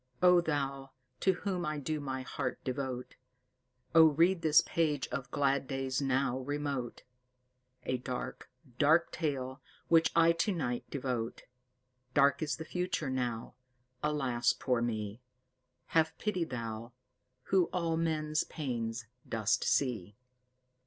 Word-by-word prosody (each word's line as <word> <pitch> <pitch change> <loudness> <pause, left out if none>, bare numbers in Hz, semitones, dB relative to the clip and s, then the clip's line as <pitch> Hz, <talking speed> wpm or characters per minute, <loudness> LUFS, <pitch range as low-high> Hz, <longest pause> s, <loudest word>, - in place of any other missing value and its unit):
O 180 -1 +7
thou, 140 -4 -2 0.3
to 190 - +3
whom 185 -1 -3
I 150 -2 -2
do 155 +2 -2
my 130 -2 -4
heart 130 -1 -3
devote, 130 -1 -4 0.8
Oh 165 -1 +9
read 165 +4 +3
this 155 -2 +6
page 155 -5 0
of 130 0 -4
glad 140 0 +1
days 135 0 -1
now 130 -1 +1
remote, 140 -2 -3 0.8
A 130 -1 -1
dark, 125 0 -5 0.3
dark 160 +3 +4
tale, 135 -4 -3 0.3
which 165 -1 +5
I 165 0 +6
tonight 165 - -1
devote! 125 -4 -3 0.7
Dark 140 0 +4
is 155 -1 0
the 160 - -7
future 180 -5 -2
now. 120 -3 -2 0.5
Alas, 135 -6 +1
poor 125 -3 0
me! 110 -1 -3 0.7
Have 160 -1 +3
pity 185 -5 -1
Thou, 115 -3 -5 0.6
who 185 -2 +6
all 165 -2 -1
men's 155 -2 0
pains 120 -5 -3 0.2
dost 115 +2 +1
see." 110 -8 0
140 Hz, 125 wpm, -32 LUFS, 125-160 Hz, 0.8 s, Oh